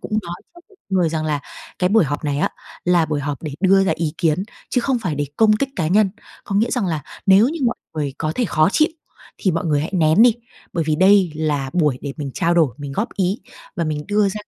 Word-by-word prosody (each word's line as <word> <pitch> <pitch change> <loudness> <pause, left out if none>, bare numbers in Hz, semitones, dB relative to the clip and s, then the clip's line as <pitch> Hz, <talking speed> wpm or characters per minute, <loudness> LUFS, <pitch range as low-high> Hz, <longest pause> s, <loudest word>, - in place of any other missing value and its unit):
cũng - - -9
nói 170 0 -6 0.2
trước 345 - -15
với 400 - -23
mọi 190 - +1
người 170 - +2
rằng 155 -1 -2
là, 150 -2 -1 0.4
cái 180 - +2
buổi 210 -3 +4
họp 145 +2 -4
này 145 -1 -1
á - - +2 0.4
là 175 -2 +3
buổi 150 -2 -2
họp 145 0 -4
để 150 -3 -5
đưa 195 0 +4
ra 195 - +2
ý 160 -3 -2
kiến, 165 +1 +1 0.3
chứ 250 - +2
không 255 0 0
phải 180 -8 -2
để 145 0 -2
công 220 -1 +5
kích 275 +4 -1
cá 165 -4 0
nhân. 200 +1 +3 0.3
Có 200 - -4
nghĩa 225 +3 +2
rằng 245 -7 0
là 160 -4 -2 0.2
nếu 195 +6 +6
như 320 0 -5
mọi 235 - 0 0.2
người 145 -3 -2
có 155 -1 -1
thể 250 - 0
khó 155 -4 +2
chịu, 310 - +4 0.5
thì 190 - +1
mọi 170 +1 -2
người 150 -3 +1
hãy 155 - -3
nén 165 +3 +4
đi, 240 -2 +6 0.4
bởi 165 -2 -1
vì 155 -1 0
đây 190 -2 +5
là 145 -4 -1
buổi 150 -7 +1
để 140 -2 -5
mình 140 -3 -5
trao 170 +1 +1
đổi, 155 -9 +3
mình 140 -1 -6
góp 210 +10 -1
ý 195 +5 0 0.4
và 170 - 0
mình 150 -1 -3
đưa 205 -1 +3
ra 195 - -5
170 Hz, 260 wpm, -20 LUFS, 150-200 Hz, 0.5 s, nếu